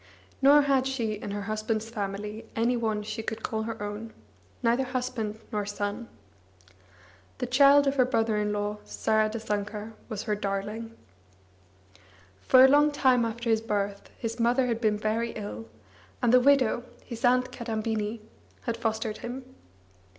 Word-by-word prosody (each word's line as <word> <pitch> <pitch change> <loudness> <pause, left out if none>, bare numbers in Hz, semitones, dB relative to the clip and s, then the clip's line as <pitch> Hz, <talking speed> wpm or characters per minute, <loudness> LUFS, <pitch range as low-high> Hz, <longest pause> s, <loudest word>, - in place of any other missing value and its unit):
Nor 285 +2 +7
had 270 -2 +2
she 235 -5 -1
in 210 0 -6
her 205 0 -3
husband's 215 +1 -2
family 210 0 -5
any 235 +2 +2
one 220 -3 -1
she 215 +2 -4
could 220 0 -5
call 220 -2 -2
her 225 0 -5
own, 210 +2 -6 0.5
neither 235 +3 +3
husband 250 -4 -3
nor 210 -2 -1
son. 205 +3 -4 1.3
The - - -2
child 280 +3 +6
of 275 0 0
her 255 - +5
brother 225 -3 +1
in 210 0 0
law 205 0 -2
Saradasankar 215 -1 -1 0.2
was 215 -2 -4
her 215 - -1
darling. 210 +3 -4 1.4
Far 260 0 +7
a - - +8
long 295 +2 +5
time 260 -4 +3
after 230 +1 -2
his 220 -1 +2
birth, 200 -2 -2
his 230 0 -4
mother 245 +3 +3
had 235 -2 -1
been 215 -2 +2
very 225 +2 -1
ill, 115 - -6 0.5
and 240 - +2
the 250 - +8
widow, 255 -3 +3 0.2
his 235 -2 -8
aunt 250 0 +3
Kadambini, 220 -1 -3 0.4
had 235 -1 -2
fostered 220 -1 -2
him. 255 +2 -6
225 Hz, 150 wpm, -28 LUFS, 210-245 Hz, 1.4 s, a